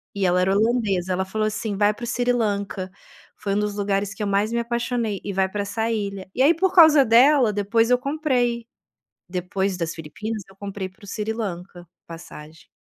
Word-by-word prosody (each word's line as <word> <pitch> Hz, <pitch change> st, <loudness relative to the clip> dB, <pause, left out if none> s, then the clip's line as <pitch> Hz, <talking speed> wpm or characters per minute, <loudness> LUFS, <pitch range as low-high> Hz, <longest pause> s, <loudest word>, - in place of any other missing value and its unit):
e 195 Hz, -1 st, 0 dB
ela 180 Hz, 0 st, +3 dB
era 190 Hz, +1 st, +2 dB
holandesa, 205 Hz, -5 st, +1 dB
ela 190 Hz, +1 st, 0 dB
falou, 215 Hz, +3 st, -1 dB
assim, 215 Hz, -1 st, -3 dB
vai 205 Hz, 0 st, +3 dB
para 240 Hz, -, -11 dB
o -, -, -7 dB
Sri 245 Hz, +1 st, 0 dB
Lanka, 200 Hz, -4 st, -2 dB, 0.5 s
foi 200 Hz, -1 st, -2 dB
um -, -, +1 dB
dos 210 Hz, -1 st, -2 dB
lugares 200 Hz, -1 st, -1 dB
que 210 Hz, -, -10 dB
eu -, -, -1 dB
mais 200 Hz, +3 st, +1 dB
me 235 Hz, -, +1 dB
apaixonei, 235 Hz, -3 st, -2 dB
e 200 Hz, -, -4 dB
vai 190 Hz, 0 st, +2 dB
para 205 Hz, +1 st, -3 dB
essa 220 Hz, +3 st, -2 dB
ilha. 200 Hz, -3 st, -4 dB
E 260 Hz, -, 0 dB
aí 320 Hz, +4 st, +6 dB
por 375 Hz, +3 st, 0 dB
causa 310 Hz, -5 st, +8 dB
dela 245 Hz, 0 st, +5 dB
depois 225 Hz, +3 st, +1 dB
eu 250 Hz, -, +5 dB
comprei, 250 Hz, -5 st, -1 dB, 0.6 s
depois 185 Hz, +1 st, -2 dB
das 165 Hz, -1 st, -3 dB
Filipinas 210 Hz, +7 st, -6 dB
eu 190 Hz, -, -19 dB
comprei 200 Hz, -1 st, -5 dB
para 200 Hz, +3 st, -20 dB
o -, -, -12 dB
Sri 215 Hz, +1 st, -3 dB
Lanka, 180 Hz, -5 st, -6 dB, 0.2 s
passagem. 160 Hz, -1 st, -11 dB
205 Hz, 205 wpm, -23 LUFS, 190-235 Hz, 0.6 s, causa